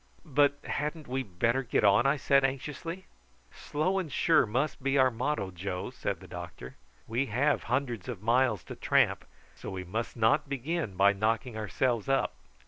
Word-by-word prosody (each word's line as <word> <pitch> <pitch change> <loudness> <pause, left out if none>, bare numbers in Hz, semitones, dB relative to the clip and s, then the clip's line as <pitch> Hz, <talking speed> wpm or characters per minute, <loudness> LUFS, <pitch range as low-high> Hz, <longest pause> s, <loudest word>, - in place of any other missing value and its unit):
"But 145 -1 +3
hadn't 150 +1 -3
we 130 +1 -1
better 115 +4 0
get 125 - 0
on?" 105 +5 +5
I 140 +2 +3
said 140 0 +3
anxiously. 150 +7 -3 0.5
"`Slow 185 +6 -1
and 160 -6 -8
sure' 160 -2 +3
must 135 +7 -1
be 135 +1 +1
our 130 -1 +5
motto, 115 -4 -2
Joe," 90 +1 -4
said - - -4
the - - -11
doctor. 65 +1 -8 0.3
"We 120 +5 0
have 135 +6 +1
hundreds 125 -3 -2
of 105 -5 -6
miles 120 -3 +2
to - - -8
tramp, - - +2 0.3
so - - -8
we 95 -1 -5
must 110 +7 -4
not 140 +6 +3
begin 140 - -2
by 100 +2 +5
knocking 110 +4 -1
ourselves 110 +3 -1
up. 135 - +1
125 Hz, 170 wpm, -29 LUFS, 110-140 Hz, 0.5 s, on